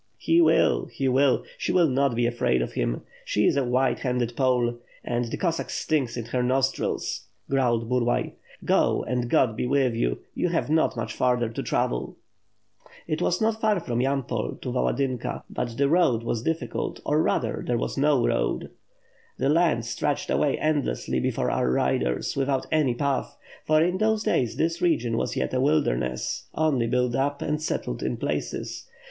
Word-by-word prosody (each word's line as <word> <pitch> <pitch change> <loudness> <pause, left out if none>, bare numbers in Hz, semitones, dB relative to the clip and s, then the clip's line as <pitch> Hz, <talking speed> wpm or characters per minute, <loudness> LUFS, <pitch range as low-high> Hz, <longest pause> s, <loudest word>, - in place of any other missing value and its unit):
"He 165 +1 +3
will, 160 -1 +3
he 135 - -3
will; 130 +1 +3 0.2
she - - -1
will 175 -3 +4
not 135 -2 +1
be 120 +1 +1
afraid 120 - +1
of - - -6
him. - - -2 0.2
She 105 - +1
is - - +3
a 140 - +2
white 125 +1 +1
handed 125 -2 -1
Pole! 125 -2 +1 0.2
And 120 0 -1
the 115 - -4
Cossack 170 -3 -1
stinks 135 -7 -1
in 115 - -4
her 125 +2 -1
nos 130 +2 +2
trils!" - - -3 0.2
growled 120 -4 +1
Burlay. 120 0 0 0.3
"Go, - - +2
and 125 -1 -2
God 115 -3 +3
be 125 - -2
with 135 -2 +2
you; - - 0 0.2
you 180 - 0
have 165 -3 -1
not 160 -5 +2
much 110 -1 -3
farther 125 -2 +1
to 115 - -4
travel." - - -1 0.9
It 155 - -2
was 180 - +1
not 220 0 +1
far 215 -3 +2
from 120 -7 -2
Yampol 130 -4 -2
to 125 - -3
Yaladynka 130 0 -1
but 120 -2 -4
the 140 - +3
road 150 -8 +3
was 115 -1 -2
difficult, 165 +6 -3
or, 150 +2 +2
rather, 115 -7 0
there 120 - 0
was - - -3
no 140 -3 +3
road. - - -1 0.7
The 135 - +1
land 155 -7 +2
stretched 115 0 -2
away - - +2
endlessly 145 - 0
before - - 0
our - - +1
riders, 60 -1 0
without 135 -1 0
any 150 -6 +2
path; 140 0 -1 0.3
for 155 0 +4
in 180 +2 0
those 220 0 +2
days 120 - +1
this 165 +2 -1
region 125 -10 +1
was - - -1
yet - - -1
a 130 - +1
wilderness, 65 - 0
only 145 -7 +1
built 125 0 +1
up 140 +3 -1
and 150 +1 -1
settled - - -3
in - - -2
places. - - -4
130 Hz, 180 wpm, -25 LUFS, 120-150 Hz, 0.9 s, will